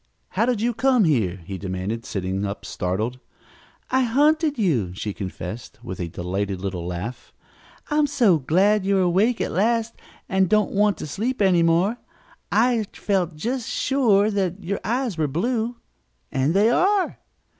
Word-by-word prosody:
"How 230 - 0
did 240 -4 0
you 240 +1 +1
come 250 0 +3
here?" 105 - +1
he 95 0 -6
demanded, 95 +4 -4
sitting 95 0 -2
up, 100 0 -4
startled. 110 +8 -2 0.7
"I 260 - +3
hunted 295 +5 +2
you," 125 - 0
she 105 +1 -4
confessed 95 +3 -7
with 95 - -6
a 90 - -2
delighted 95 +3 -3
little 90 -3 -4
laugh. 90 +8 -6 0.6
"I'm 300 0 +3
so 235 - +3
glad 190 +9 +3
you're 195 0 +2
awake 195 +7 +2
at - - -1
last 230 +5 +1 0.3
and 190 -2 +2
don't 215 0 +3
want 205 0 +2
to - - -6
sleep 230 - -2
any 185 -4 +4
more. 170 +7 +2 0.5
I 235 -1 +3
felt 180 -5 -1
just 235 +9 -3
sure 220 -6 +2
that 195 -1 -2
your 200 +4 -2
eyes 235 -6 -1
were 155 - +2
blue. 230 - -1 0.6
And 135 +6 +1
they 210 +4 +4
are!" 385 +7 +2
190 Hz, 155 wpm, -23 LUFS, -, 0.7 s, any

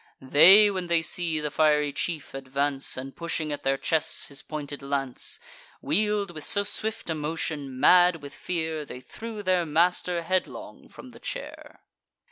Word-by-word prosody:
They, 180 +10 +7
when 185 -2 -4
they 170 -1 +2
see 165 -1 -1
the 150 -1 -3
fiery 150 -2 +2
chief 160 -4 -4
advance, 135 +1 0
And 135 +1 -7
pushing 165 -2 -3
at 145 - -4
their 135 0 0
chests 160 +2 -1
his 140 -1 -6
pointed 145 -2 -6
lance, 140 -2 -2 0.4
Wheel'd 205 +5 0
with 155 -3 -9
so 200 - +1
swift 220 +2 -1
a - - +1
motion, 150 -3 -4
mad 180 +4 +6
with 140 -1 -10
fear, 160 -3 -3
They 125 -3 -9
threw 220 - -8
their 185 -2 +2
master 170 +2 +1
headlong 185 +2 -4
from - - -13
the - - -15
chair. - - -8
160 Hz, 160 wpm, -26 LUFS, 145-180 Hz, 0.4 s, They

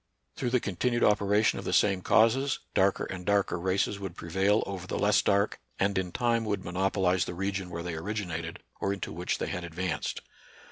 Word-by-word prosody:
Through 125 - -1
the 125 +1 +3
continued 120 +5 0
operation 105 +1 +3
of - - -8
the - - -1
same 100 -3 +3
causes, 130 +8 +3 0.2
darker 95 +1 +2
and 90 -1 -6
darker 100 -2 +1
races 95 +2 0
would 95 -3 -6
prevail 95 +5 +1
over 95 -2 -6
the - - -2
less 105 0 +4
dark, 100 +1 +1 0.2
and 100 +1 +1
in 95 -2 -1
time 120 0 +1
would 100 -3 -2
monopolize 95 -1 +1
the 90 - -6
region 95 0 -2
where 85 -1 -5
they 85 -1 -4
originated 85 -2 -4 0.2
or 100 - 0
into 95 -5 -5
which 90 +2 -2
they - - -2
had 90 - -4
advanced. 85 +1 -3
95 Hz, 190 wpm, -29 LUFS, 90-105 Hz, 0.2 s, less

